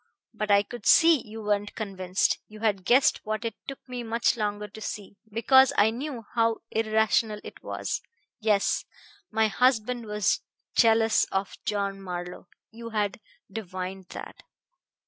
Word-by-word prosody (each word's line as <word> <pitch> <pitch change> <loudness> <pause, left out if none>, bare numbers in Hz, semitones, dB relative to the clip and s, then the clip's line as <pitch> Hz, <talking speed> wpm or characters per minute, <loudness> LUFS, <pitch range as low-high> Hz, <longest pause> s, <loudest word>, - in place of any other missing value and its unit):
But 215 -1 -3
I 200 0 +5
could 240 0 -7
see 325 -4 +7
you 220 +1 -8
weren't 205 0 -1
convinced. 190 -3 0
You 215 0 -13
had 200 -4 0
guessed 260 +3 +4
what 215 +2 -3
it 230 - -2
took 275 - -5
me 250 -1 -5
much 230 0 +1
longer 210 -2 -2
to 215 +2 -12
see, 205 -1 -6 0.2
because 265 +4 +5
I 210 +2 +5
knew 250 -1 -5
how 230 -1 +1
irrational 220 -1 +1
it - - -11
was. - - -3 0.4
Yes; 210 -3 +2 0.5
my 220 0 +2
husband 245 0 +1
was 210 -1 +1 0.3
jealous 225 -1 +4
of 195 0 -3
John 200 -1 -1
Marlowe; 180 -1 -6 0.2
you 230 +1 -8
had 210 -2 -1 0.3
divined 185 -2 -6
that. - - -9
215 Hz, 145 wpm, -27 LUFS, 205-230 Hz, 0.5 s, see